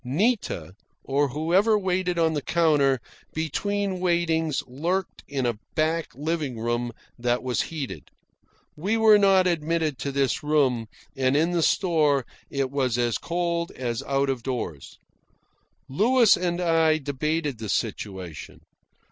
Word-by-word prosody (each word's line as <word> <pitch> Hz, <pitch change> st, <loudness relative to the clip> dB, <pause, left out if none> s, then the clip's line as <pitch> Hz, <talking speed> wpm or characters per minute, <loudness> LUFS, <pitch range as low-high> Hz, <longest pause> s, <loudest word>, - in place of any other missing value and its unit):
Nita, 140 Hz, -, -1 dB, 0.3 s
or 140 Hz, +1 st, +1 dB
whoever 175 Hz, -, +2 dB
waited 185 Hz, -2 st, -1 dB
on 165 Hz, -1 st, +2 dB
the 145 Hz, -, -1 dB
counter, 145 Hz, -5 st, +2 dB, 0.4 s
between 195 Hz, +5 st, -1 dB
waitings 165 Hz, -4 st, +1 dB
lurked 170 Hz, +9 st, -3 dB
in 135 Hz, -3 st, -2 dB
a 120 Hz, -3 st, -1 dB, 0.2 s
back 160 Hz, +1 st, +1 dB
living 150 Hz, -3 st, -2 dB
room 120 Hz, +1 st, -1 dB, 0.3 s
that 120 Hz, +1 st, 0 dB
was 125 Hz, -1 st, 0 dB
heated. 150 Hz, -5 st, -6 dB, 0.7 s
We 195 Hz, +9 st, 0 dB
were 220 Hz, -2 st, +6 dB
not 195 Hz, -2 st, +5 dB
admitted 160 Hz, -4 st, 0 dB
to 140 Hz, -, -3 dB
this 135 Hz, -2 st, 0 dB
room, 135 Hz, -6 st, +1 dB, 0.3 s
and 130 Hz, +1 st, +2 dB
in 165 Hz, +3 st, +2 dB
the 175 Hz, -1 st, +1 dB
store 155 Hz, -, +2 dB, 0.2 s
it 135 Hz, -2 st, -2 dB
was 130 Hz, -4 st, 0 dB
as 120 Hz, -3 st, 0 dB
cold 170 Hz, 0 st, -1 dB
as 120 Hz, -1 st, -3 dB
out 140 Hz, 0 st, 0 dB
of 130 Hz, -3 st, -4 dB
doors. 115 Hz, -, -5 dB, 0.9 s
Louis 225 Hz, -, +4 dB
and 175 Hz, -1 st, -1 dB
I 165 Hz, -2 st, +3 dB
debated 145 Hz, -1 st, -2 dB
the 110 Hz, -2 st, -5 dB
situation. 95 Hz, -4 st, -4 dB
150 Hz, 135 wpm, -25 LUFS, 130-175 Hz, 0.9 s, were